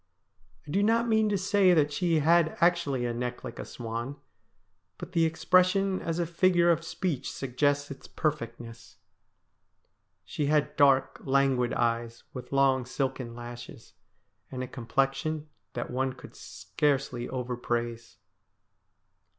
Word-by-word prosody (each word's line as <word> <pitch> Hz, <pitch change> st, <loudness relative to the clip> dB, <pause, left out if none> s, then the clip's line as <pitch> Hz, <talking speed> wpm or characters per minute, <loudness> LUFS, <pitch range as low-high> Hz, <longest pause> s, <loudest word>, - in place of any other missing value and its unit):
I -, -, -7 dB
do 195 Hz, -, +2 dB
not 230 Hz, +3 st, +2 dB
mean 220 Hz, -1 st, +3 dB
to 205 Hz, -, +1 dB
say 190 Hz, -1 st, +3 dB
that 150 Hz, -2 st, +2 dB
she 165 Hz, -1 st, +1 dB
had 165 Hz, +1 st, +3 dB
actually 170 Hz, -8 st, +2 dB
a 120 Hz, -, -1 dB
neck 125 Hz, +1 st, -4 dB
like -, -, -8 dB
a -, -, -5 dB
swan, 120 Hz, +3 st, -5 dB, 0.8 s
but -, -, -8 dB
the 165 Hz, -3 st, +3 dB
expression 185 Hz, +4 st, +2 dB
as 165 Hz, 0 st, -2 dB
a 175 Hz, -, 0 dB
figure 175 Hz, +1 st, +3 dB
of 165 Hz, 0 st, 0 dB
speech 165 Hz, -5 st, -3 dB
suggests 145 Hz, +2 st, -1 dB
its 135 Hz, -, -10 dB
perfectness. 115 Hz, -6 st, -4 dB, 1.3 s
She 145 Hz, -, -2 dB
had 150 Hz, 0 st, +1 dB
dark, 135 Hz, -2 st, +3 dB
languid 135 Hz, -2 st, +2 dB
eyes, 115 Hz, 0 st, -1 dB
with 125 Hz, -, -8 dB
long 135 Hz, -1 st, +3 dB
silken 130 Hz, -2 st, -3 dB
lashes, 120 Hz, +1 st, -10 dB, 0.6 s
and 130 Hz, -1 st, -5 dB
a -, -, -5 dB
complexion 135 Hz, +5 st, -2 dB, 0.2 s
that -, -, -4 dB
one 130 Hz, +1 st, -1 dB
could 125 Hz, -, -13 dB
scarcely 135 Hz, -4 st, -2 dB
overpraise. 120 Hz, -2 st, -3 dB
140 Hz, 135 wpm, -28 LUFS, 125-170 Hz, 1.3 s, mean